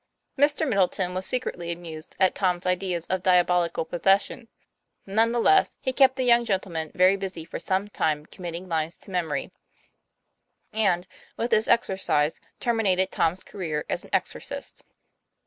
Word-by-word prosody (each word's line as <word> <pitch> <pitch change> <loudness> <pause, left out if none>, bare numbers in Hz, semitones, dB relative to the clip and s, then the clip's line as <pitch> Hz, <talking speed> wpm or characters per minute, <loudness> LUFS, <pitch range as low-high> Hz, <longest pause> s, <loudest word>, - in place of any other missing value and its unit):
Mr. 290 +2 +2
Middleton 190 -4 +1
was 185 +1 -2
secretly 180 -9 -2
amused 170 -2 -8
at 190 -1 +4
Tom's 180 -2 0
ideas 180 -2 -1
of 185 -1 -1
diabolical 180 -2 +2
possession; 195 +7 +1 0.6
none 220 +4 +2
the 240 - -1
less, 390 +11 +4
he 260 - -2
kept 265 -1 +5
that 260 - -1
young 240 -1 +5
gentleman 185 -7 -2
very 185 +2 +5
busy 190 -4 -6
for 165 - -6
some 190 +2 -1
time 155 -7 -1
commit 175 0 -8
ting 180 +2 -7
lines 165 -1 -2
to - - -14
memory; 175 -5 -2 1.2
and 190 -5 +1 0.3
with 235 +1 -2
this 220 0 +3
exercise 190 -8 +1 0.2
termi 235 -2 0
nated 185 +1 +1
Tom's 170 +3 0
career 160 -6 -4
as - - -2
an - - -14
exorcist. - - -3
185 Hz, 155 wpm, -25 LUFS, 170-215 Hz, 1.2 s, kept